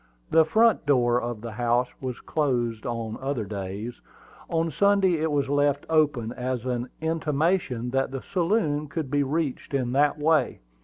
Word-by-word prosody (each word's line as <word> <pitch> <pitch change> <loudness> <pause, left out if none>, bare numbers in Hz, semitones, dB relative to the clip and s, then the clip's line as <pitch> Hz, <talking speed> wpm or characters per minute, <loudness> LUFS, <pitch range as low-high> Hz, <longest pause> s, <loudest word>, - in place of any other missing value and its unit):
The 160 -1 +6
front 220 0 +3
door 125 -3 +3
of 120 -3 -4
the 115 0 -6
house 120 +2 +1
was 130 -2 -4
closed 120 -7 -1
on 115 -2 -4
other 135 -5 -2
days; 100 +4 -6 0.5
on 165 0 0
Sunday 195 0 +3
it 160 0 0
was 140 -2 +1
left 145 0 +1
open, 145 -8 +2
as 125 -1 -3
an 125 0 -2
intimation 155 -5 0
that 135 +1 +1
the 135 -1 -6
saloon 170 -5 0
could 140 -1 -4
be 145 0 +2
reached 140 -1 -2
in 125 -3 0
that 145 +3 +3
way. 155 - +1
140 Hz, 160 wpm, -26 LUFS, 120-155 Hz, 0.5 s, The